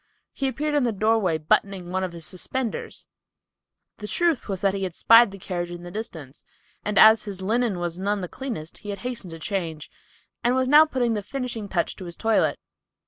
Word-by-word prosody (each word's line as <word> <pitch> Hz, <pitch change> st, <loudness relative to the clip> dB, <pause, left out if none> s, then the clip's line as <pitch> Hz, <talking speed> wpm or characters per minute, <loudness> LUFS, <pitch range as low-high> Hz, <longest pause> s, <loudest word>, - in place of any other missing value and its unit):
He 270 Hz, -, -1 dB
appeared 300 Hz, +3 st, -2 dB
in 290 Hz, -, +3 dB
the 240 Hz, -2 st, +1 dB
doorway 210 Hz, -5 st, +2 dB
buttoning 180 Hz, +3 st, 0 dB
one 190 Hz, +1 st, -1 dB
of 185 Hz, -, -3 dB
his 170 Hz, -2 st, -8 dB
suspenders. 230 Hz, +7 st, -4 dB, 0.9 s
The 210 Hz, -, -6 dB
truth 335 Hz, -3 st, 0 dB
was 190 Hz, -2 st, -3 dB
he 195 Hz, 0 st, +1 dB
had 185 Hz, -3 st, -3 dB
spied 230 Hz, 0 st, +7 dB
the 195 Hz, -, -10 dB
carriage 175 Hz, -2 st, -4 dB
in 175 Hz, 0 st, -8 dB
the 175 Hz, -, -8 dB
distance, 160 Hz, -, -7 dB, 0.4 s
and 210 Hz, -1 st, -2 dB
as 220 Hz, +1 st, +7 dB
his 195 Hz, -2 st, -5 dB
linen 225 Hz, 0 st, +1 dB
was 175 Hz, 0 st, -3 dB
none 200 Hz, +1 st, 0 dB
the 180 Hz, -, -4 dB
cleanest 200 Hz, -, -6 dB
he 205 Hz, -, -9 dB
hastened 240 Hz, -3 st, -6 dB
to 165 Hz, -, -7 dB
change, 165 Hz, -3 st, -4 dB, 0.5 s
and 245 Hz, +1 st, +2 dB
was 260 Hz, 0 st, +1 dB
now 300 Hz, +3 st, +8 dB
putting 250 Hz, -6 st, 0 dB
the 210 Hz, -, -1 dB
finishing 235 Hz, -2 st, -5 dB
touch 175 Hz, -3 st, -1 dB
to 185 Hz, -, -8 dB
his 170 Hz, -1 st, -6 dB
toilet. 225 Hz, -1 st, +1 dB
200 Hz, 195 wpm, -24 LUFS, 175-240 Hz, 0.9 s, now